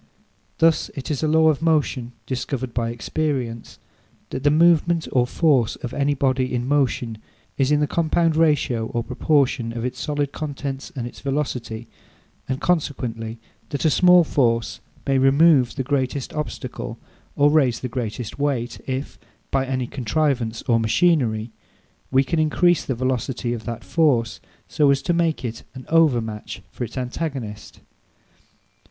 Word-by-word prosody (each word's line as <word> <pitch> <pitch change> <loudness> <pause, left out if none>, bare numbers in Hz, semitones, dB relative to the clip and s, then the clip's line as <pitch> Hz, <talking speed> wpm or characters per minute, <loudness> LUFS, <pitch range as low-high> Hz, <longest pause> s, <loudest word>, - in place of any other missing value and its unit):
Thus, 165 -1 +3
it 140 +3 -5
is 145 - -2
a 155 - +1
law 160 +1 +5
of 150 -1 0
motion, 145 -7 0
discovered 130 -1 -3
by 115 -1 -1
experience, 120 -1 -3 0.5
that 130 - -3
the 145 - +5
moment 165 +1 +3
or 125 -1 +2
force 135 -7 +2
of 120 - -7
any 145 0 +1
body 130 -1 +1
in 120 0 -2
motion 125 -5 0 0.4
is 135 0 +1
in 150 0 +3
the - - +3
compound 165 +1 +1
ratio 145 -8 +2
or 120 0 -2
proportion 130 -2 +1
of 115 - -3
its 125 - -4
solid 145 -2 -1
contents 140 -3 -5
and 125 -3 -3
its 120 - -9
velocity; 125 -5 -3 0.6
and 130 0 -1
consequently, 125 -10 -1 0.3
that 140 - -3
a 155 - +4
small 180 +3 +6
force 115 -7 0 0.3
may 135 -1 +2
remove 135 -2 +4
the 135 - -2
greatest 135 0 -2
obstacle 150 -1 -5 0.4
or 145 +1 +4
raise 135 -6 +2
the 130 - -2
greatest 115 -1 -5
weight, 135 -4 -1
if, 130 +1 -4 0.3
by 135 -1 +1
any 130 -1 -1
contrivance 120 -2 -1
or 115 -2 +2
machinery, 115 -3 +2 0.6
we 135 +1 +4
can 160 +5 -1
increase 170 +2 +3
the 130 - -2
velocity 125 -1 -1
of 110 -3 -6
that 115 0 -5
force, 130 -9 +1 0.3
so 150 -2 +2
as 140 -1 +2
to 175 - +1
make 165 -5 0
it 115 -1 -5
an 130 - -9
overmatch 120 -10 +1
for - - -5
its 120 +2 -7
antagonist. 125 -4 -5
135 Hz, 155 wpm, -22 LUFS, 120-150 Hz, 0.6 s, small